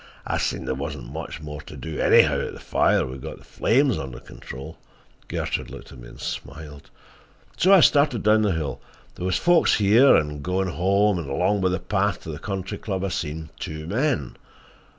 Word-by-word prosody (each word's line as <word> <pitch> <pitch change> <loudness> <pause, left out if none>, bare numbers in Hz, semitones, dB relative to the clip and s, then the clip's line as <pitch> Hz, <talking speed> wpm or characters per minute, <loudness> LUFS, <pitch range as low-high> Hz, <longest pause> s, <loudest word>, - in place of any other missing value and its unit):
I - - -1
seen - - -2
there - - -1
wasn't 70 -2 -6
much 80 0 -6
more 75 -1 -7
to - - -11
do 80 -2 -6
anyhow - - +5
at - - -4
the - - -10
fire—we'd 65 0 +1
got - - -7
the - - -17
flames 130 0 +1
under 65 -2 -7
control"—Gertrude 65 +2 -7
looked - - -11
at 65 - -12
me - - -11
and - - -14
smiled—"so 75 - -5
I 195 -3 +8
started 140 -8 +4
down 110 +1 +4
the 105 -3 +2
hill. 75 -6 -4 0.3
There 90 - -4
was 95 - +1
folks 175 -1 +4
here 110 +7 +6
and 75 -1 +1
there 75 - -6
goin' 90 +4 -1
home, 100 +3 +2
and 75 -5 -6
along 90 +8 +1
by 95 - +2
the 90 - -1
path 100 -2 -1
to 80 - -6
the 75 - -7
Country 95 0 -5
Club 95 -3 -3
I 100 - -1
seen 80 -2 -4
two 80 0 -6
men. 110 - -1
90 Hz, 190 wpm, -24 LUFS, 75-105 Hz, 0.3 s, I